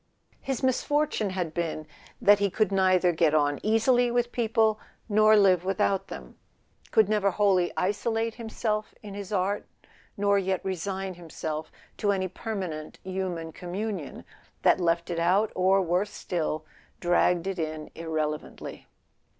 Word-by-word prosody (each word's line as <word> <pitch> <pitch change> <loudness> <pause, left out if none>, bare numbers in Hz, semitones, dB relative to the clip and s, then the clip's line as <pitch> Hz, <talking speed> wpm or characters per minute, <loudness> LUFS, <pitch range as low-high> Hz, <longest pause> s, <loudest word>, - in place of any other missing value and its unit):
His 270 -1 -3
misfortune 275 -3 +1
had 180 -4 -3
been 165 -2 -3 0.3
that 205 0 +6
he 200 0 +2
could 215 +3 +1
neither 185 -2 +4
get 160 -2 +2
on 145 -1 +2
easily 240 +3 +3
with 240 0 0
people 220 -2 +2 0.3
nor 215 0 +5
live 185 -4 +4
without 195 0 0
them; 65 -3 -10 0.5
could 220 -3 +4
never 210 -2 +2
wholly 190 -2 +2
isolate 225 +4 0
himself 220 -2 -3
in 205 -2 -8
his 200 0 -7
art, 200 +1 0 0.5
nor 200 0 +3
yet 190 -1 -2
resign 190 +1 -3
himself 160 -2 -6 0.3
to 205 - +1
any 190 -1 0
permanent 185 -6 -5
human 185 -3 -3
communion 185 -1 -5 0.4
that - - +5
left 170 0 0
it 170 - -2
out, 190 +6 +2
or, 190 +1 +3
worse 180 +4 0
still, 155 -3 -3 0.3
dragged 175 0 +2
it 190 -2 -3
in 155 -1 -4
irrelevantly. 155 -2 -4
190 Hz, 140 wpm, -27 LUFS, 170-215 Hz, 0.5 s, that